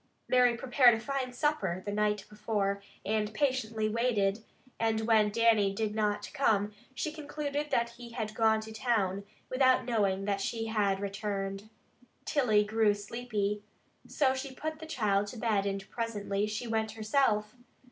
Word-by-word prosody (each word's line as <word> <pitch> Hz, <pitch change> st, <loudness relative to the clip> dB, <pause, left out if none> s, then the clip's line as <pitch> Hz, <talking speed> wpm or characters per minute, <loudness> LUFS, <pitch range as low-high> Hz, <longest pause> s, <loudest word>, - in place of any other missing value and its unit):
Mary 245 Hz, -2 st, +4 dB
prepared 245 Hz, -1 st, +5 dB
a -, -, -4 dB
fine 265 Hz, +1 st, -3 dB
supper 245 Hz, -, -1 dB
the 205 Hz, -, -2 dB
night 210 Hz, -1 st, 0 dB
before, 205 Hz, -2 st, -1 dB, 0.2 s
and 210 Hz, +1 st, 0 dB
patiently 225 Hz, -5 st, 0 dB
waited, 215 Hz, -2 st, +1 dB, 0.4 s
and 220 Hz, -1 st, +1 dB
when 220 Hz, -2 st, +4 dB
Dannie 215 Hz, -3 st, +3 dB
did 215 Hz, 0 st, -1 dB
not 210 Hz, -1 st, -1 dB
come, 215 Hz, -8 st, +2 dB, 0.2 s
she 230 Hz, +7 st, -2 dB
concluded 295 Hz, -1 st, -4 dB
that 235 Hz, -3 st, +1 dB
he 235 Hz, 0 st, -11 dB
had 220 Hz, -3 st, -3 dB
gone 220 Hz, -1 st, +3 dB
to 220 Hz, 0 st, -9 dB
town, 200 Hz, -5 st, 0 dB, 0.2 s
without 255 Hz, 0 st, +3 dB
knowing 200 Hz, -5 st, +1 dB
that 200 Hz, -1 st, 0 dB
she 225 Hz, +2 st, -2 dB
had 205 Hz, -3 st, +1 dB
returned. 195 Hz, 0 st, -4 dB, 0.6 s
Tilly 220 Hz, -8 st, +3 dB
grew 215 Hz, 0 st, +2 dB
sleepy, 210 Hz, -1 st, -3 dB, 0.5 s
so 265 Hz, -3 st, +2 dB
she 265 Hz, 0 st, -5 dB
put 315 Hz, +2 st, -4 dB
the 320 Hz, -, -8 dB
child 205 Hz, -8 st, +1 dB
to 220 Hz, -, -8 dB
bed, 215 Hz, -4 st, +1 dB
and 195 Hz, -1 st, -3 dB
presently 210 Hz, -3 st, -2 dB
she 215 Hz, +3 st, -4 dB
went 220 Hz, -1 st, -1 dB
herself. 215 Hz, -1 st, +1 dB
220 Hz, 155 wpm, -31 LUFS, 205-245 Hz, 0.6 s, prepared